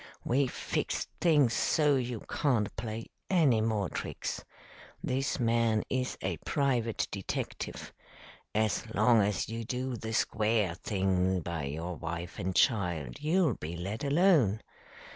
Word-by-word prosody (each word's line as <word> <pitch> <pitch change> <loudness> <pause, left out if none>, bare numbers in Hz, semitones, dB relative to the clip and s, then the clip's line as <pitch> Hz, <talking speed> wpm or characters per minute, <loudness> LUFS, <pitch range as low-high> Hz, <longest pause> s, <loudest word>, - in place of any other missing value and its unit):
We've 130 +1 +2
fixed - - -2
things 145 -8 +4
so 150 -2 +3
you 125 -3 -2
can't 120 -8 0
play 110 0 -4 0.2
any 150 - +4
more 110 -3 0
tricks. - - -4 0.6
This 135 +2 -1
man 115 -2 +2
is 130 -1 -1
a - - -1
private 125 -6 0
detective. 100 -2 -4 0.6
As 110 +1 0
long 115 -3 +5
as 100 -1 0
you 115 +1 -4
do 125 +2 -3
the 110 0 -5
square 110 -4 +1
thing 95 -1 0
by 85 -2 -3
your 80 +5 -4
wife 85 +3 -5
and 95 -1 -2
child, 85 - +1
you'll 160 -2 +3
be 85 -2 -6
let 100 +7 -4
alone. 140 - +4
110 Hz, 130 wpm, -31 LUFS, 95-130 Hz, 0.6 s, long